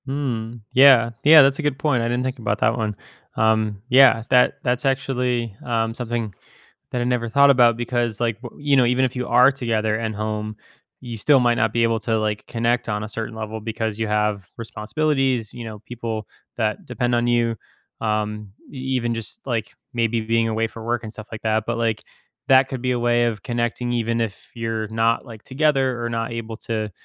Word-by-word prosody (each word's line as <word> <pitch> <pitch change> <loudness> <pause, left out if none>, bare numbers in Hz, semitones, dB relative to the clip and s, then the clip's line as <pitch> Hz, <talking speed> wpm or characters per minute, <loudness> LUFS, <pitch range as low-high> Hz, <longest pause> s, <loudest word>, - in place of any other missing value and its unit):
Hmm, 120 -5 -3 0.2
yeah, 130 -3 +7
yeah. 155 +1 +9
That's 135 +2 +2
a - - 0
good 145 -3 -1
point. 135 -4 +1
I 115 - 0
didn't 120 +1 -1
think 130 0 -3
about 105 -2 -1
that 115 - +2
one. 110 -3 -2 0.4
Um, 110 -2 +1
yeah, 130 -3 +6
that 125 -1 +4
that's 125 +1 0
actually, 125 -4 -1
um, 115 -2 0
something 115 -3 -4 0.6
that 125 - -1
I - - +1
never 120 -1 0
thought 140 +4 +5
about 120 -4 +5
because, 120 -2 -2
like, 115 -2 -1
w 120 +2 -11
you 145 -1 +3
know, 125 - +5
even 125 +2 +2
if 130 - -4
you 125 0 -3
are 125 +3 +6
together 110 -4 -1
at 110 -1 -3
home, 110 0 -4 0.5
you 120 -2 -7
still 135 +6 +4
might 120 -1 +3
not 110 -1 +1
be 115 - +2
able 115 -1 +1
to, 115 -1 0
like, 105 -1 -2
connect 120 +1 0
on 105 0 -2
a 110 - -6
certain 115 +1 -5
level 110 0 -5
because 110 -1 -3
you 110 - -1
have 105 -3 0
responsibilities, 125 +1 -1
you 120 - -7
know, 110 -2 -8
people 110 -1 -6 0.3
that 110 -3 -1
depend 120 -1 -1
on 120 0 +1
you, 120 -1 +2 0.4
um, 105 -1 -2 0.2
e - - -9 0.2
even 120 -2 0
just, 115 - -7
like, 115 -5 -3 0.2
maybe 115 -1 0
being 115 +1 +1
away 115 0 0
for 115 0 -10
work 120 0 -1
and 110 - -7
stuff 110 0 -10
like 110 - -7
that. 110 0 +1
But, 120 0 -2
like, 115 -2 -1 0.4
that 130 0 +6
could 130 -3 -5
be 125 - +1
a 125 - 0
way 120 0 +2
of 110 -4 -2
connecting 120 0 -2
even 115 0 0
if 110 -4 -5
you're 115 -2 -3
not, 115 +2 +1
like, 115 -4 -11
together 135 -3 +1
or 120 - -2
not 115 0 -3
able 115 -1 -5
to, 110 -2 -4
115 Hz, 210 wpm, -22 LUFS, 110-125 Hz, 0.6 s, yeah